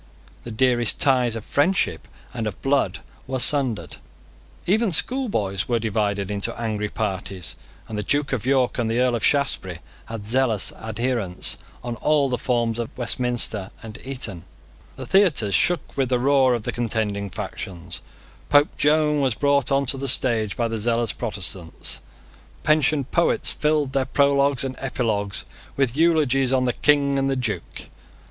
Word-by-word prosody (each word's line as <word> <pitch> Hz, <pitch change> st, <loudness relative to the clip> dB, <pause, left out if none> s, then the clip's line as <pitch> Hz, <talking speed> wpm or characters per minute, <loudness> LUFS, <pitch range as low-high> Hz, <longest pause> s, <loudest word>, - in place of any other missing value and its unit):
The 120 Hz, -, -6 dB
dearest 120 Hz, 0 st, +2 dB
ties 125 Hz, -4 st, +3 dB
of 110 Hz, -, -6 dB
friendship 175 Hz, +7 st, +1 dB, 0.3 s
and 115 Hz, -3 st, -3 dB
of 105 Hz, -, -6 dB
blood 135 Hz, 0 st, +1 dB, 0.3 s
were 130 Hz, 0 st, -2 dB
sundered. 125 Hz, -, +1 dB, 0.7 s
Even 210 Hz, +3 st, +2 dB
schoolboys 165 Hz, -, +1 dB
were 120 Hz, -, +1 dB
divided 105 Hz, -3 st, -1 dB
into 105 Hz, +3 st, -2 dB
angry 105 Hz, -2 st, -2 dB
parties; 95 Hz, -5 st, -4 dB, 0.3 s
and 110 Hz, -1 st, -4 dB
the -, -, -2 dB
Duke 145 Hz, +6 st, 0 dB
of 125 Hz, -, -1 dB
York 130 Hz, -1 st, +1 dB
and 115 Hz, -2 st, 0 dB
the 115 Hz, +2 st, 0 dB
Earl 125 Hz, -1 st, +2 dB
of 115 Hz, -, -2 dB
Shaftesbury 130 Hz, -, +1 dB, 0.3 s
had 115 Hz, -2 st, -7 dB
zealous 115 Hz, -3 st, +2 dB
adherents 110 Hz, -4 st, -1 dB, 0.3 s
on 120 Hz, -1 st, -4 dB
all 145 Hz, +3 st, +2 dB
the 125 Hz, -2 st, -2 dB
forms 120 Hz, -2 st, 0 dB
of 115 Hz, -, -3 dB
Westminster 120 Hz, -4 st, 0 dB
and 110 Hz, 0 st, -9 dB
Eton. 125 Hz, -10 st, -5 dB, 0.5 s
The -, -, -7 dB
theatres 155 Hz, -, +3 dB
shook 175 Hz, -, +1 dB
with 135 Hz, -3 st, 0 dB
the 125 Hz, -, +2 dB
roar 130 Hz, 0 st, +3 dB
of 115 Hz, -, -5 dB
the -, -, -2 dB
contending 105 Hz, -4 st, -2 dB
factions. 90 Hz, -4 st, -7 dB, 0.5 s
Pope 145 Hz, +1 st, +4 dB
Joan 150 Hz, 0 st, +3 dB
was 130 Hz, -5 st, +1 dB
brought 140 Hz, 0 st, +1 dB
on 140 Hz, 0 st, +2 dB
the 135 Hz, +1 st, -1 dB
stage 115 Hz, -5 st, +1 dB
by 120 Hz, -, +1 dB
the 115 Hz, -1 st, -3 dB
zealous 115 Hz, 0 st, 0 dB
Protestants. 95 Hz, -6 st, -3 dB, 0.6 s
Pensioned 150 Hz, -2 st, +2 dB
poets 170 Hz, -, +2 dB
filled 150 Hz, -3 st, 0 dB
their 135 Hz, -1 st, +1 dB
prologues 140 Hz, -1 st, +2 dB
and 130 Hz, -1 st, -4 dB
epilogues 110 Hz, -7 st, -2 dB, 0.3 s
with 135 Hz, -3 st, +1 dB
eulogies 145 Hz, -5 st, +2 dB
on 130 Hz, -1 st, +2 dB
the 125 Hz, -, +1 dB
King 140 Hz, -2 st, +2 dB
and 135 Hz, 0 st, 0 dB
the 135 Hz, -, 0 dB
Duke. 125 Hz, -5 st, -4 dB
125 Hz, 155 wpm, -23 LUFS, 110-140 Hz, 0.7 s, Pope